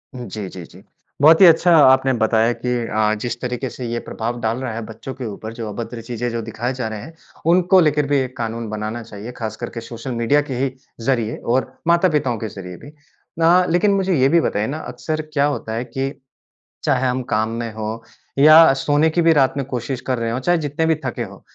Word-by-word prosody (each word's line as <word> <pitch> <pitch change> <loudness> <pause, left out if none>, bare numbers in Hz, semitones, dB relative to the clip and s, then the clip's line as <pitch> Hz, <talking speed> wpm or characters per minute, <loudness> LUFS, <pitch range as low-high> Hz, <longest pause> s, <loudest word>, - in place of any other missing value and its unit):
हुँ 125 -1 -6
जी, 100 0 -5
जी, 90 - -9
जी। 90 +4 -16 0.4
बहुत 160 +4 +7
ही 190 - +10
अच्छा 170 +1 +6
आपने 130 -2 +5
बताया 110 0 +2
कि 125 - -1 0.2
अ, 110 0 +1
जिस 120 -1 -3
तरीके 125 +1 -3
से 125 +1 -7
ये 120 0 -2
प्रभाव 120 +2 -5
डाल 115 +1 0
रहा 120 -4 -3
है 115 - -4
बच्चों 115 +4 -8
के 130 0 -7
ऊपर 110 +1 -7
जो 115 -1 -6
अभद्र 115 +2 -6
चीज़ें 120 +1 -4
जो 115 0 -3
दिखाए 115 +3 -4
जा 125 -3 -3
रहे 110 -1 -5
हैं, 160 - -11 0.4
उनको 180 +1 +5
लेकर 150 -3 +2
भी 145 - +2
एक 130 -1 -4
कानून 115 0 -4
बनाना 110 +2 -4
चाहिए, 110 +1 -9
ख़ास 110 -3 -5
करके 120 0 -6
सोशल 115 +2 -7
मीडिया 120 +5 +2
के 145 -3 -5
ही 135 0 0 0.3
ज़रिए 115 -4 0
और 130 +2 0
माता-पिताओं 155 -8 +2
के 110 - -4
ज़रिए 90 -2 -9
भी। 145 - -13 0.5
ना 170 +3 +5
लेकिन 180 +5 +3
मुझे 195 -2 +1
ये 130 +1 +4
भी 170 +2 +4
बताइए 105 -7 -1
ना 145 - -4 0.2
अक्सर 155 +6 -3
क्या 140 -1 +3
होता 140 -6 -3
है 115 +2 -2
कि 135 +3 -3 0.7
चाहे 130 0 +2
हम 125 +1 -1
काम 110 +1 +1
में 115 -2 -5
हों 110 +1 -4 0.4
या 155 +2 +9
सोने 145 +3 +2
की 170 +2 +1
भी 165 0 +5
रात 135 -4 +3
में 140 - -1
कोशिश 130 0 -4
कर 130 -2 0
रहे 115 0 -2
हों, 120 +3 -2
चाहे 175 +6 +2
जितने 155 +2 -1
भी 160 - +3
थके 120 -2 -3
हों, 100 -3 -9
125 Hz, 225 wpm, -20 LUFS, 115-145 Hz, 0.7 s, ही